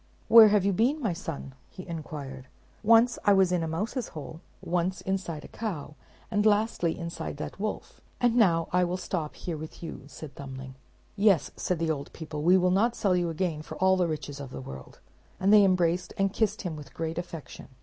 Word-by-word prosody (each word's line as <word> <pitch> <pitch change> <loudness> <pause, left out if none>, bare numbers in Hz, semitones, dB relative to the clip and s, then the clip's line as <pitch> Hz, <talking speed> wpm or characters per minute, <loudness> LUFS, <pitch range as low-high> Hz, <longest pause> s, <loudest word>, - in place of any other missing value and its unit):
"Where 230 -1 +10
have 205 -2 +3
you 200 - +2
been, 245 - +2
my 220 - 0
son?" 165 -7 -6 0.2
he 185 - -10
inquired. 145 -6 -7 0.3
"Once 230 +2 +5
I 205 - +5
was 190 -2 +4
in 180 -2 +1
a 165 - -2
mouse's 210 - -2
hole, 160 +2 -8 0.2
once 180 +2 -1
inside 185 -5 -3
a - - -9
cow, 180 -10 -5 0.4
and 205 -1 +2
lastly 210 -5 +2
inside 170 -3 -5
that 150 - -6
wolf; 215 +1 -5 0.2
and 240 -1 +3
now 170 -8 +4
I 180 0 +4
will 180 +1 -1
stop 165 -4 -4
here 170 -3 -5
with 155 +2 -9
you," 165 - -6
said 145 +1 -10
Thumbling. 130 -1 -8 0.4
"Yes," 200 -5 +3
said 180 - -1
the 165 0 0
old 140 -2 -4
people, 155 -2 -6
"we 180 +4 +5
will 180 0 +3
not 230 +6 +2
sell 190 -3 +2
you 175 -1 +1
again 165 -2 -2
for - - -9
all 190 0 +4
the 180 -2 +1
riches 145 -3 -5
of 140 -2 -7
the - - -7
world;" 65 - -10 0.4
and 195 +2 +4
they 210 -1 +8
embraced 180 -2 +1
and 195 0 +1
kissed 215 -1 0
him 175 -4 -3
with 150 -2 -11
great 165 0 -3
affection. 170 -3 -8
180 Hz, 205 wpm, -28 LUFS, 155-200 Hz, 0.4 s, Where